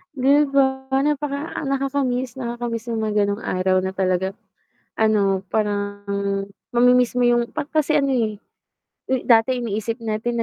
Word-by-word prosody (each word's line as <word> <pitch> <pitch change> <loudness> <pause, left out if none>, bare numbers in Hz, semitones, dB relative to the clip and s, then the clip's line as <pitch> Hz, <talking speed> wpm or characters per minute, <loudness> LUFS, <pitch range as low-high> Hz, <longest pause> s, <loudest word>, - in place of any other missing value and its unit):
'Di 280 +3 +4
ba? 265 -1 +2 0.2
napaka 295 +1 -2
nakaka-miss 270 -2 -1
nakaka-miss 235 -2 -4
yung 220 - -1
mga 210 -1 +1
ganong 205 +2 -2
araw 185 0 +1
na 190 - -2
talagang, 190 +1 0 0.6
ano, 205 -3 +2
parang 205 -1 -2 0.6
mami-miss 245 0 +3
mo 245 - +3
yung 240 -1 +2
pag - - -4
kasi 305 -1 +2
ano 275 -1 +1
eh, 220 -4 0 0.9
dati 230 +2 +4
iniisip 230 +1 -3
natin 230 +2 -1
235 Hz, 130 wpm, -22 LUFS, 210-265 Hz, 0.9 s, Di